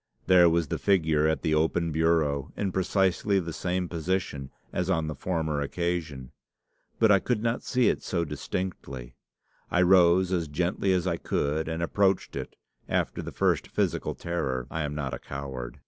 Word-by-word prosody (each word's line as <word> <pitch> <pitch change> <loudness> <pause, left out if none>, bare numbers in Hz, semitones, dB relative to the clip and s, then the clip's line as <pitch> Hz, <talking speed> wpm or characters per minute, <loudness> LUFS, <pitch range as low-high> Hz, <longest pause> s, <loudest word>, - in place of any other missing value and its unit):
There 90 -2 +6
was 85 -2 +1
the - - -2
figure 80 -6 +2
at 80 - 0
the 80 - +1
open 80 +2 +1
bureau, 80 -3 +1
in 100 -2 -1
precisely 95 +1 +1
the 85 -3 -5
same 90 +1 -2
position 85 -5 -2 0.2
as 90 +1 -1
on 80 -4 +1
the 75 - -3
former 80 -4 -2
occasion. 75 -4 -3 0.7
But 110 -2 +5
I 100 - +6
could 115 +1 -1
not 115 0 0
see 125 -2 +1
it - - +1
so 85 -2 -1
distinctly. 75 -4 -5 0.6
I 90 - +3
rose 90 0 +5
as 85 -3 0
gently 90 +5 0
as 90 -1 +1
I 85 -2 0
could, 80 0 -1
and 80 +1 -2
approached 95 +2 +1
it, - - -6 0.3
after - - -1
the - - -6
first - - +1
physical - - -1
terror. 65 -8 -2
I 80 - -2
am 75 -1 -3
not 70 -3 -3
a - - -4
coward. 65 -3 -6
85 Hz, 175 wpm, -27 LUFS, 75-95 Hz, 0.7 s, There